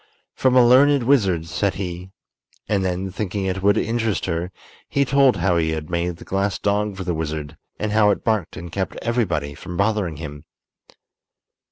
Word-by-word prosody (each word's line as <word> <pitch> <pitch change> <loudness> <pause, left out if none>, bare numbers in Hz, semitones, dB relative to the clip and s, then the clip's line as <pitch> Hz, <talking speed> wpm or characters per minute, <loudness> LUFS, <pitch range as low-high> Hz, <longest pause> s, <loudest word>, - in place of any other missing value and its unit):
"From 130 -1 +2
a 125 -1 +7
learned 140 +2 +5
wizard," 100 - +2
said 95 +3 -1
he; 90 -1 -5 0.6
and 100 -2 +1
then, 95 +1 -2
thinking 100 0 -3
it 95 0 -2
would 100 +1 +3
interest 115 -2 0
her, 85 +1 -2 0.4
he 140 0 +2
told 135 -1 +4
how 90 -3 +1
he 80 -1 +1
had 80 +1 -5
made 85 0 -1
the - - -13
glass 100 +1 -1
dog 105 0 -1
for 95 - -4
the 90 -1 -1
wizard, 80 -1 -4 0.2
and 105 0 -2
how 105 -1 +4
it 100 - 0
barked 110 -7 -1
and 85 +1 -8
kept 95 +2 -3
everybody 85 -12 -1
from 85 +4 -8
bothering 100 -6 0
him. 75 -2 -8
95 Hz, 180 wpm, -22 LUFS, 85-110 Hz, 0.6 s, a